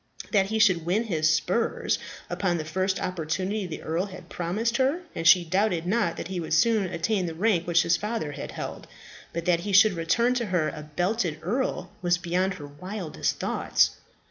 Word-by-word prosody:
That 195 -3 +3
he 220 +2 -1
should 185 -7 +4
win 185 +7 +1
his 155 -8 +1
spurs 185 +9 0 0.3
upon 180 -3 0
the 155 - -4
first 190 +4 -1
opportunity 185 +4 -2
the 160 - -7
earl 170 +5 -1
had 190 -1 -11
promised 215 +8 -1
her, 275 +7 +1
and 165 - -1
she 175 -1 +7
doubted 185 -1 +1
not 185 -3 0
that - - -5
he 185 -2 -3
would 160 -1 -1
soon 220 +4 +3
attain 185 +2 -1
the 165 - -5
rank 180 -2 +1
which 170 -1 +4
his 170 - +2
father 210 -8 -3
had 145 - -7
held. - - -6 0.4
But 170 0 -4
that 175 -2 +3
he 200 +3 -4
should 200 +2 +7
return 185 +9 +2
to 240 -3 -1
her 175 -5 +1
a 150 - -7
belted 175 +3 -1
earl 245 +9 -2
was 175 -1 +2
beyond 180 +2 0
her 150 -5 -8
wildest 180 +4 -4
thoughts. - - +2
180 Hz, 195 wpm, -26 LUFS, 165-210 Hz, 0.4 s, she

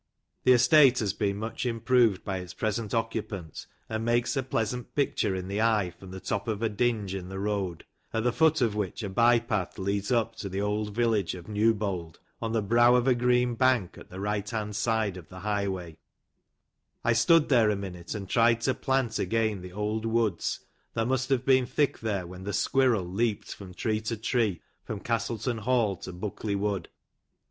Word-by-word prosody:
The 130 - +7
estate 130 +2 +6
has 105 -5 0
been 100 -2 -1
much 110 +2 -4
improved 115 -3 +2
by 95 -2 -2
its 90 -1 -9
present 110 -1 -2
occupant, 110 -7 -3 0.2
and 110 0 -3
makes 120 +4 +1
a 135 - +1
pleasant 125 -1 -3
picture 115 -8 +1
in 95 0 -4
the 100 +2 -1
eye 110 -5 +2
from 95 +2 -13
the 95 +1 -7
top 100 +2 -3
of 110 0 -2
a 115 - +2
dinge 105 -3 0
in 95 -2 -5
the 95 - -6
road, 100 -4 -2 0.3
at 110 - -1
the 125 - +2
foot 160 -2 +3
of 115 -4 +2
which 105 +1 -3
a 100 - -3
by 120 +4 +4
path 110 -6 -2
leads 100 +2 -2
up 115 -2 +1
to 100 - -5
the 95 +1 -3
old 105 0 -1
village 110 -6 +1
of 90 -1 -10
Newbold, 105 -6 0 0.2
on 115 -1 -2
the 110 -2 0
brow 120 +4 +5
of 125 +1 +2
a 130 - +6
green 125 0 +2
bank, 125 -6 +2
at - - -13
the 95 - -8
right 105 0 -2
hand 105 -2 -3
side 110 -2 0
of 85 -4 -11
the 90 0 -10
highway, 95 -5 -3 1.0
I 120 - +3
stood 150 +8 +4
there 120 -6 +5
a 105 - +1
minute, 90 -3 -6
and 100 -2 -5
tried 115 +2 +3
to 130 +2 +1
plant 130 -2 0
again 110 -4 0
the 90 0 -9
old 105 +2 -2
woods, 115 -2 0 0.3
that 115 - +1
must 130 +1 0
have 130 -2 +1
been 130 -2 +4
thick 145 -2 0
there, 100 -5 -2
when 90 +2 -9
the 100 +1 -4
squirrel 125 -7 +2
leaped 105 +4 -1
from 95 -3 -11
tree 110 +2 -1
to 110 +1 -3
tree, 110 -4 0 0.2
from 105 - -5
Castleton 115 +1 -2
Hall 115 -3 +1
to - - -8
Buckley 100 +3 -4
Wood. 100 -3 -2
110 Hz, 200 wpm, -28 LUFS, 100-120 Hz, 1.0 s, The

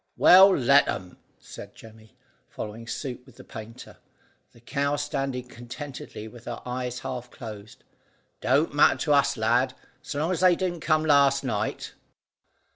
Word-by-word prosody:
"Well, 190 +2 +7
let 140 +2 +4
'em," 90 -1 -5 0.2
said - - -12
Jemmy, 110 -1 -16 0.3
following 110 +2 -8
suit 125 +1 -5
with 130 -2 -19
the - - -13
painter, 110 +1 -11 0.5
the - - -20
cow 140 +4 -1
standing 135 -3 -3
contentedly 125 -2 -9
with 120 +1 -14
her 120 - -5
eyes 125 0 -4
half 125 -2 -6
closed. 110 -4 -11 0.6
"Don't - - +1
matter - - +4
to 150 - +1
us, 140 -2 +2
lad, 120 +4 +1 0.3
so 145 - -6
long 160 +5 0
as 180 - -1
they 180 -1 +5
didn't 175 -2 -3
come 155 0 +1
last 140 -2 +4
night." 110 -5 -3
125 Hz, 150 wpm, -26 LUFS, 115-145 Hz, 0.6 s, Well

